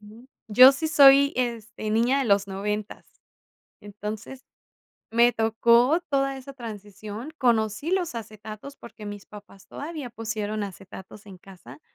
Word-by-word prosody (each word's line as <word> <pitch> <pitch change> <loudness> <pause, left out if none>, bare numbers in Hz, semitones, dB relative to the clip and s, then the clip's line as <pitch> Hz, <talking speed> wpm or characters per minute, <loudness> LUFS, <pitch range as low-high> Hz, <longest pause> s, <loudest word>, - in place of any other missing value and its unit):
Sí. 220 +4 -16 0.2
Yo 255 +5 +8
sí 315 +4 -3
soy, 280 -1 +6
este, 230 -3 -3
niña 235 +5 +2
de 270 - 0
los 200 -2 +2
noventas. 210 +2 -5 0.8
Entonces, 210 +5 -8 0.7
me 235 +2 +4
tocó 235 +7 +3
toda 275 -1 0
esa 265 +1 -10
transición. 215 +1 -9
Conocí 230 +4 0
los 365 -6 -1
acetatos 215 +4 -9
porque 220 -3 -12
mis 205 -1 -8
papás 205 -2 -15
todavía 295 -4 -7
pusieron 215 -2 -4
acetatos 195 +1 -10
en 190 -2 -12
casa, 175 -8 -15
225 Hz, 130 wpm, -25 LUFS, 210-265 Hz, 0.8 s, Yo